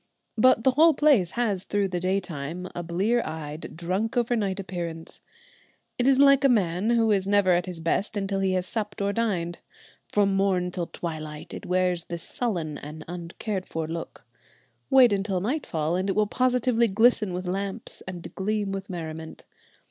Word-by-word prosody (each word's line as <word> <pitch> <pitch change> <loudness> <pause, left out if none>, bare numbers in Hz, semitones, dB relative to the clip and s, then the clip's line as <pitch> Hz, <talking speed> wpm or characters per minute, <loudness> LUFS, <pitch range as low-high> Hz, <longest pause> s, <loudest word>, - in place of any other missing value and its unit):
But 225 0 +4
the 265 - +5
whole 315 +4 +5
place 260 - +3
has 210 -6 0
through 205 -1 0
the 180 -1 -2
day 185 +2 +1
time 170 0 -6
a 175 - -4
blear 190 +8 +1
eyed, 155 -1 -6
a - - -4
drunk 185 +9 -2
over 240 0 +2
night 200 -3 -1
appearance. 170 -4 -6 0.8
It 245 - +2
is 270 -1 +5
like 275 0 +6
a 275 - +6
man 195 -3 +1
who 230 -2 +3
is 195 -2 +1
never 200 -2 +4
at 175 0 +2
his 180 -2 -6
best 195 +6 0
until 195 -1 -1
he 190 -1 +1
has 185 -1 0
supped 210 +1 -3
or 200 0 0
dined. 185 -7 -1 0.5
From 200 -1 +2
morn 185 -2 +1
till 175 -2 -3
twilight 155 -3 -6
it - - -7
wears 180 -1 +1
this 170 -1 -4
sullen 170 -11 -3
and 155 +2 -9
uncared 180 +3 -5
for 160 -1 -3
look. 165 +1 -7 0.6
Wait 260 -5 +6
until 195 -1 0
nightfall, 180 - -1
and 185 +2 -1
it 195 - 0
will 215 - +3
positively 250 0 +2
glisten 220 0 +3
with 180 +1 -4
lamps 195 +4 -4
and 180 -2 -7
gleam 205 0 -1
with 195 +1 -5
merriment. 160 -2 -7
190 Hz, 180 wpm, -26 LUFS, 175-220 Hz, 0.8 s, like